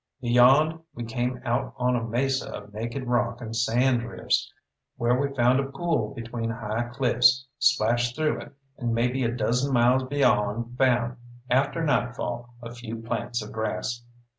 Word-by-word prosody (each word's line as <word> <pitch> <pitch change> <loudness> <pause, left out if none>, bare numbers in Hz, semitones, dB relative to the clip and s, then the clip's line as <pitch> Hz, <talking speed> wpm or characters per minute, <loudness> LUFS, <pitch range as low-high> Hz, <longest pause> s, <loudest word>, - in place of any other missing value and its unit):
Beyond 130 +6 +4 0.2
we 120 - -5
came 125 +2 -2
out 120 +2 -1
on 125 0 +1
a 120 - -1
mesa 130 +4 -1
of 105 0 -9
naked 115 +5 -4
rock 120 -1 0
and 115 -2 -6
sand 120 +2 +2
drifts, 120 0 -1 0.5
where 120 +1 +2
we 140 +2 0
found 125 +1 +4
a 135 0 -2
pool 140 -6 -1
between 115 0 -4
high 115 +1 -3
cliffs, 130 +1 +3
splashed 120 -3 +2
through 155 -1 0
it, - - -12 0.3
and 120 -2 -1
maybe 125 +3 +1
a 115 - +1
dozen 125 +3 0
miles 125 +1 +4
beyond 120 -4 +1
found 125 -1 +2 0.3
after 140 +6 +2
nightfall 120 -2 -1
a 115 0 -7
few 120 -1 -7
plants 115 0 -3
of 105 - -9
grass. 120 +2 -3
120 Hz, 160 wpm, -26 LUFS, 115-130 Hz, 0.5 s, Beyond